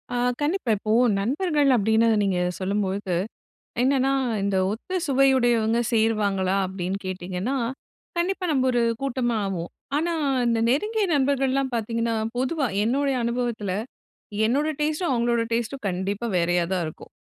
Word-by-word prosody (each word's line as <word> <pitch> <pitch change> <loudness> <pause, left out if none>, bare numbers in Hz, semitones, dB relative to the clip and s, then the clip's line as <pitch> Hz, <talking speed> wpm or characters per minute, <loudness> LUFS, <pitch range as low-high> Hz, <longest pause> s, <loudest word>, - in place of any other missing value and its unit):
ஆ, - - 0 0.2
கண்டிப்பா. 295 - 0
இப்போ, 215 +2 -3 0.3
நண்பர்கள் 290 - +1
அப்படின்னு 220 +1 +3 0.2
நீங்க 190 -3 +1 0.2
சொல்லும்பொழுது, 195 -1 -1 0.7
என்னென்னா 270 +1 +2 0.3
இந்த 200 -1 +1
ஒத்த 370 - -4
சுவையுடையவங்க 240 -4 +3
சேருவாங்களா 205 -4 +1
அப்படின்னு 190 0 -3
கேட்டிங்கன்னா? 185 +6 -3 0.6
கண்டிப்பா, 365 +1 0
நம்ப 265 -3 +2
ஒரு 240 - +2 0.2
கூட்டமா 245 -3 0
ஆவோம். 175 -3 -3 0.3
ஆனா 335 +3 0 0.3
இந்த 230 -1 +2
நெருங்கிய 420 - +1
நண்பர்கள்லாம் 270 -1 +1
பார்த்தீங்கன்னா, 230 0 -1 0.2
பொதுவா 265 +2 0 0.2
என்னுடைய 270 +4 +1
அனுபவத்துல, 235 -4 -2 0.8
என்னோட 275 +7 +1
டேஸ்ட்டும், 310 +2 0
அவங்களோட 235 -1 +1
டேஸ்ட்டும் 235 +2 -2
கண்டிப்பா 195 +5 -2
வேறையா 175 0 +2
தான் 180 -2 -1
இருக்கும். 155 - -10
235 Hz, 120 wpm, -24 LUFS, 200-275 Hz, 0.8 s, அப்படின்னு